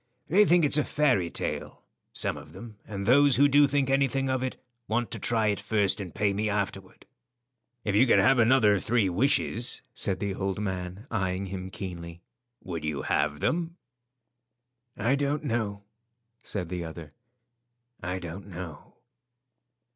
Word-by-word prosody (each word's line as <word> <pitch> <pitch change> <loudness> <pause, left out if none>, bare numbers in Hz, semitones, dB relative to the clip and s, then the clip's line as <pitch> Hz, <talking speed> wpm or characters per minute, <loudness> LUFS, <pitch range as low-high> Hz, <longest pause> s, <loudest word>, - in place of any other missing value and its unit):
They 200 +6 +5
think 175 -3 +4
it's 145 +1 +4
a - - +2
fairy 130 - +1
tale; - - -4 0.3
some - - -1
of - - -12
them, 115 -3 -10
and 100 -2 -5
those 140 +3 +5
who 140 +3 +5
do 145 +1 +5
think 140 -1 +1
anything 135 0 +1
of 130 -1 0
it 130 0 -3 0.3
want 120 +2 -1
to - - -4
try 110 -2 +1
it 100 - -1
first 105 -1 0
and 90 -3 -6
pay 100 -1 0
me 105 +2 -1
afterward." 95 -2 -4 0.8
"If 105 - -1
you 115 +6 +5
could - - +5
have 135 -1 +4
another 110 -4 +5
three 110 -3 +1
wishes," 120 +3 +1
said 95 -7 0
the 100 -1 -2
old 95 0 -3
man, 95 0 -4
eyeing 95 -3 -1
him 95 0 -6
keenly, 85 -3 -8 0.4
"would 85 -4 -5
you 75 -2 -3
have 75 -1 0
them?" 170 +1 -1 1.2
"I 120 +5 +1
don't 145 +1 0
know," 110 -6 -2 0.6
said 90 -7 -3
the 90 -1 -3
other. 80 -2 -9 0.9
"I 90 +2 -3
don't 90 +2 -8
know." 90 -5 -9
105 Hz, 160 wpm, -27 LUFS, 95-130 Hz, 1.2 s, They